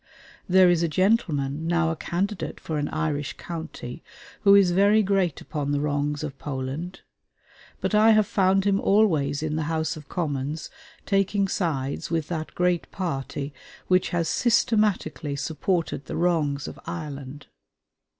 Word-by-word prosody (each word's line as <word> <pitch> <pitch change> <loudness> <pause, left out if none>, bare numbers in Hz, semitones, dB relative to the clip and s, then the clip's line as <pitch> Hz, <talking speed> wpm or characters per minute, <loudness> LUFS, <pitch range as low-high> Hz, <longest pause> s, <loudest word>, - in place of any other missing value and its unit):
There 185 0 +6
is 175 -2 +3
a 170 - +2
gentleman, 160 -5 +1
now 170 -1 +2
a - - -2
candidate 180 +4 -3
for 155 -2 -3
an 145 - -1
Irish 150 -2 -2
county, 160 -5 -7 0.4
who 200 -1 +6
is 195 -3 +5
very 200 +4 +4
great 190 -5 +1
upon 145 -2 -3
the 145 - +1
wrongs 145 0 -1
of 145 -3 -6
Poland; 145 +6 -5 0.8
but - - -1
I 215 +1 +6
have 215 -1 +5
found 195 -3 +2
him 200 -1 +3
always 160 -9 +2
in 155 0 -1
the 160 - -1
House 160 -1 -1
of 150 -2 -12
Commons 150 -2 -3 0.3
taking 195 0 +1
sides 145 -8 -2
with 165 -3 -1
that 160 -2 -4
great 180 -1 +1
party 140 -5 -4 0.4
which 185 0 +3
has 170 -2 0
systematically 210 - +1
supported 160 +1 -2
the - - -4
wrongs 155 -5 +1
of - - -8
Ireland. 145 -4 -6
165 Hz, 150 wpm, -25 LUFS, 145-190 Hz, 0.8 s, There